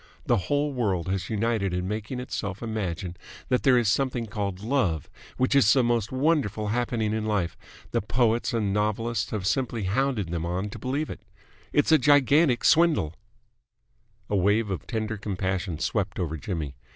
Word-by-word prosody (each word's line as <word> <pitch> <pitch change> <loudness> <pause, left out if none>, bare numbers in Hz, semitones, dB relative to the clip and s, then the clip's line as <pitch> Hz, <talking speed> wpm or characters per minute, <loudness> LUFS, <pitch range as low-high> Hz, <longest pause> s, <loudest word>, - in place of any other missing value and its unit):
The - - +3
whole 145 0 +1
world 100 -9 -1
has 95 0 -2
united 110 -4 0
in 90 +1 -2
making 110 +5 -4
itself 105 -5 -4
imagine 95 -6 -3 0.3
that 125 -1 +2
there 130 -2 +5
is 120 -3 +2
something 125 +1 +1
called 100 -3 -3
love 110 - 0 0.3
which 130 +2 +2
is 135 -7 +6
the 130 -2 +4
most 120 -3 0
wonderful 130 -7 +1
happening 115 -2 0
in 110 0 -1
life. 100 -6 0 0.4
The - - +1
poets 115 +2 +1
and 105 -4 0
novelists 105 +3 0
have 105 -4 -3
simply 115 0 0
hounded 110 -1 0
them 85 -1 -2
on 90 +4 -2
to - - -8
believe 140 +4 -2
it. - - -8 0.5
It's 145 +2 +2
a 155 - +7
gigantic 145 0 +4
swindle." 160 - +4 1.1
A 105 - -1
wave 105 +2 +2
of 95 - -4
tender 110 -2 -2
compassion 95 -3 -2
swept 100 +3 -1
over 80 -4 -2
Jimmy. 80 -3 -4
110 Hz, 165 wpm, -26 LUFS, 95-125 Hz, 1.1 s, a